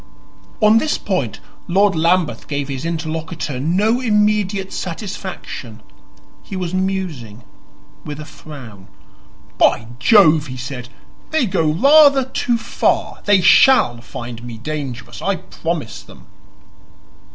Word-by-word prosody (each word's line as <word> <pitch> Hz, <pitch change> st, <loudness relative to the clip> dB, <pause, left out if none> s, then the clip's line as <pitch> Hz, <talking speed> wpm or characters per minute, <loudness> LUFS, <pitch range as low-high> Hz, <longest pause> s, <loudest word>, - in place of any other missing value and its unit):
On 215 Hz, +1 st, +6 dB
this 305 Hz, +5 st, 0 dB
point -, -, -2 dB, 0.3 s
Lord 195 Hz, +2 st, +3 dB
Lambeth 170 Hz, +1 st, +1 dB
gave 145 Hz, -1 st, -3 dB
his 135 Hz, +2 st, -4 dB
interlocutor 160 Hz, -3 st, -4 dB
no 200 Hz, -, +1 dB
immediate 210 Hz, -4 st, +1 dB
satisfaction; 175 Hz, -, -6 dB, 0.6 s
he -, -, -9 dB
was 180 Hz, -2 st, -3 dB
musing, 180 Hz, -, -3 dB, 0.6 s
with 150 Hz, -1 st, -7 dB
a 150 Hz, -, -7 dB
frown. 145 Hz, -10 st, -12 dB, 0.7 s
"By 115 Hz, -, +3 dB
Jove," 160 Hz, -, +5 dB
he 130 Hz, -1 st, -7 dB
said, 125 Hz, -1 st, -7 dB, 0.4 s
"they 315 Hz, -5 st, +1 dB
go 165 Hz, -6 st, +1 dB
rather 280 Hz, -, +5 dB
too 250 Hz, -2 st, -1 dB
far. -, -, -1 dB
They 205 Hz, -2 st, +4 dB
SHALL 170 Hz, -, +5 dB
find 120 Hz, -1 st, -8 dB
me 120 Hz, -2 st, -8 dB
dangerous 125 Hz, -3 st, -6 dB
I 200 Hz, 0 st, 0 dB
promise 165 Hz, -8 st, -5 dB
them." -, -, -16 dB
165 Hz, 120 wpm, -19 LUFS, 135-200 Hz, 0.7 s, On